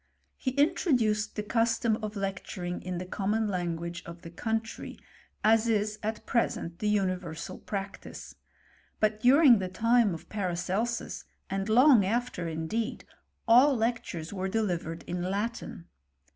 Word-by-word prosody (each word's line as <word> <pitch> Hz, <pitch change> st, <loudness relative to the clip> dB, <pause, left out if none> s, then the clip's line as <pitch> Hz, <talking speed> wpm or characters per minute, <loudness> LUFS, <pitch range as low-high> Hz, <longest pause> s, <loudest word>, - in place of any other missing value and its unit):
He 260 Hz, -, -2 dB
intro 305 Hz, +3 st, +2 dB
duced 215 Hz, -3 st, +1 dB
the 210 Hz, -, -2 dB
custom 230 Hz, 0 st, +1 dB
of 215 Hz, 0 st, -4 dB
lecturing 185 Hz, -2 st, -4 dB
in 180 Hz, -1 st, -4 dB
the 180 Hz, -, -4 dB
common 210 Hz, +4 st, -1 dB
lan 175 Hz, -4 st, -1 dB
guage 170 Hz, +1 st, -6 dB
of 170 Hz, 0 st, -10 dB
the 165 Hz, -, -9 dB
country, 225 Hz, +4 st, -3 dB, 0.5 s
as 225 Hz, +1 st, +4 dB
is 215 Hz, -1 st, 0 dB
at 220 Hz, +1 st, -4 dB
present 175 Hz, -8 st, -1 dB
the 210 Hz, -, 0 dB
universal 185 Hz, -5 st, -2 dB
practice: 195 Hz, -1 st, -6 dB, 0.7 s
but 215 Hz, 0 st, +1 dB
during 255 Hz, 0 st, +7 dB
the 185 Hz, -1 st, -3 dB
time 225 Hz, 0 st, +3 dB
of 160 Hz, -, -11 dB
Paracelsus, 195 Hz, +4 st, -2 dB, 0.3 s
and 195 Hz, +1 st, -2 dB
long 250 Hz, 0 st, +7 dB
after 225 Hz, -3 st, -1 dB
indeed, 165 Hz, +9 st, -3 dB, 0.4 s
all 255 Hz, +5 st, +7 dB
lectures 220 Hz, -8 st, -2 dB
were 190 Hz, -1 st, -2 dB
delivered 175 Hz, -6 st, -2 dB
in 175 Hz, -, -3 dB
I^itin. 200 Hz, +2 st, -3 dB
210 Hz, 140 wpm, -29 LUFS, 180-230 Hz, 0.7 s, during